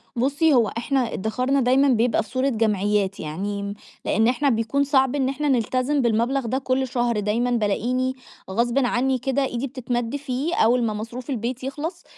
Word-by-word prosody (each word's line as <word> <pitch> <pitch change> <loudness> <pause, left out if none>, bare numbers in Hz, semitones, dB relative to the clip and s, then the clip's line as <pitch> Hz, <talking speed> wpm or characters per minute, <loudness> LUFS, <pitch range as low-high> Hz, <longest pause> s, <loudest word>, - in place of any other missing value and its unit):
بُصّي 285 +5 +2
هو 235 -4 +4
إحنا 250 0 0
إدخارنا 255 +7 0
دايمًا 260 +3 +4
بيبقى 240 -2 +2
في 210 - -17
صورة 260 +2 0
جمعيات 205 -3 0
يعني، 200 +6 -4 0.3
لأن 225 +2 +2
إحنا 260 +3 +2
بيكون 230 +4 +1
صعب 265 -1 +2
إن 265 -2 +1
إحنا 290 +2 -2
نلتزم 255 +3 +1
بالمبلغ 235 +3 +1
ده 255 +3 -1
كُلّ 260 0 0
شهر، 240 -3 0
دايمًا 230 +4 0
بالاقيني 245 +4 0 0.4
غصبٍ 235 +5 0
عني 255 +2 +1
كده 270 +1 0
إيدي 250 +2 -3
بتتمد 245 0 -3
فيه 285 +4 -2
أول 240 +2 +3
ما 220 -2 0
مصروف 235 +5 -7
البيت 250 0 -3
يخلص 310 +6 -5
250 Hz, 170 wpm, -23 LUFS, 225-270 Hz, 0.4 s, هو